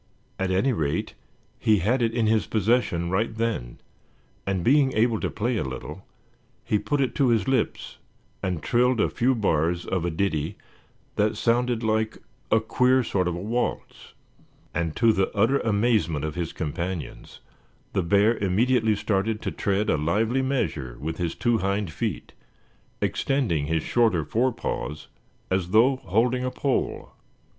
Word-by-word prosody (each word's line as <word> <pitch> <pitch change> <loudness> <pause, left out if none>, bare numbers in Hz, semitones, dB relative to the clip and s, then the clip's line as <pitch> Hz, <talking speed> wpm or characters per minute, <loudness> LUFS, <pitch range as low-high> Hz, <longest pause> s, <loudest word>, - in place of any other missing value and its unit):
At 95 0 0
any 95 +9 +2
rate 75 -8 -2 0.5
he 110 -1 +3
had 115 +8 +1
it 115 -1 +2
in 115 -1 0
his 110 0 +2
possession 105 -6 +1
right 110 +4 0
then, 110 - -2 0.7
and 95 -3 -1
being 135 - +4
able 110 0 +2
to - - -2
play 115 +3 -1
a - - 0
little, 65 0 -7 0.6
he 105 - +1
put 145 +5 -1
it 130 -3 0
to 140 - +2
his 115 -5 +2
lips 130 -4 -1 0.4
and 90 -4 -2
trilled 125 0 +2
a - - +3
few 130 +1 +2
bars 85 -5 0
of 95 -3 -1
a 85 - 0
ditty 80 0 -1 0.6
that 105 +1 +1
sounded 120 0 +1
like 110 0 0 0.3
a 110 - +4
queer 125 +3 +2
sort 95 -5 0
of 90 - -1
a - - -5
waltz. 115 +6 -3 0.6
And 85 -1 -2
to 115 -1 +4
the 95 -1 +1
utter 120 +7 +3
amazement 105 - +1
of 75 - -3
his 85 -1 -3
companions 85 +2 -5 0.5
the 95 - +1
bear 100 +6 +3
immediately 110 +3 +2
started 105 +2 -1
to - - -2
tread 100 +1 0
a - - +2
lively 110 - +1
measure 80 - -2
with 80 +2 -4
his 85 -2 -2
two 120 -2 +1
hind 100 -2 -1
feet, - - -4 0.7
extending 95 - 0
his 80 0 0
shorter 110 -10 +2
forepaws 115 - -2 0.4
as 95 -2 0
though 120 +7 +4
holding 120 +5 +1
a 130 - 0
pole. 135 +1 -2
105 Hz, 155 wpm, -25 LUFS, 90-120 Hz, 0.7 s, being